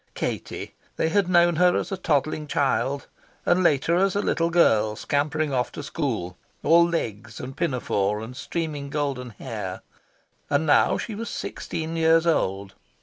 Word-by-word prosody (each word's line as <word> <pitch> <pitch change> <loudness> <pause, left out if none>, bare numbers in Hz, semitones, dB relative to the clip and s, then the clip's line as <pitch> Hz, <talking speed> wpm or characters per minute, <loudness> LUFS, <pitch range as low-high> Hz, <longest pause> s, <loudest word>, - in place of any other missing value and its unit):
Katie! - - -4 0.2
they 160 - +1
had 190 +1 +2
known 175 -2 +4
her 180 0 +4
as - - -3
a - - 0
toddling 155 -3 0
child; 140 -1 0 0.4
and 175 +1 +3
later 165 0 +3
as 195 +1 +2
a - - +2
little 165 -4 +1
girl 110 -11 +3
scampering 150 +3 -1
off 125 -1 0
to 150 - -6
school, 120 - -3 0.2
all 170 +3 +6
legs 115 -9 -4
and 130 +1 -7
pinafore 105 -9 0
and 115 +3 -8
streaming 150 -1 -4
golden 140 -4 -2
hair. 110 - -6 0.7
And 145 +2 +2
now 150 - +4
she 225 - -5
was 230 +3 -5
sixteen 165 0 -4
years 165 0 +4
old. 100 - 0
150 Hz, 155 wpm, -25 LUFS, 125-170 Hz, 0.7 s, all